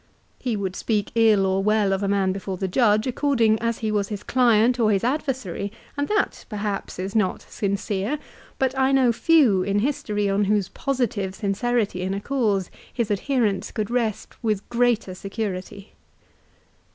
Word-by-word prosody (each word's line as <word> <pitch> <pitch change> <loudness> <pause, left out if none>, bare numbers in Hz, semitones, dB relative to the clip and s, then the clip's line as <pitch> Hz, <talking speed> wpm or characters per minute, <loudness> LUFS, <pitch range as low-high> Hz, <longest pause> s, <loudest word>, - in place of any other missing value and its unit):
He 245 -3 -1
would 190 -2 -3
speak 210 -3 -1
ill 220 -4 +4
or 190 0 +1
well 210 -1 +2
of 190 - -1
a 200 - 0
man 195 -1 +2
before 190 0 -4
the 190 - -2
judge, 215 +1 +3
according 245 -4 +2
as 230 0 -1
he 215 - 0
was 205 -2 0
his 205 -1 -6
client 245 -1 +3
or 220 -2 +3
his 195 0 +1
adversary, 250 - -2 0.2
and 285 0 -1
that 420 -1 0
perhaps 205 -2 -4
is 190 +3 -4
not 210 -4 +1
sincere. 200 +5 -2 0.4
But 265 0 0
I 265 0 +2
know 260 -3 +4
few 245 - +4
in 200 +2 0
history 210 -4 0
on 200 +1 +1
whose 205 -1 +1
positive 225 -8 -2
sincerity 210 -1 -1
in 190 +1 -2
a - - -2
cause 210 -6 0 0.2
his 235 -4 -2
adherents 215 -1 0
could 215 0 -3
rest 235 -1 -2
with 215 -3 -1
greater 235 -5 +1
security. 195 0 -5
210 Hz, 165 wpm, -24 LUFS, 195-240 Hz, 0.4 s, ill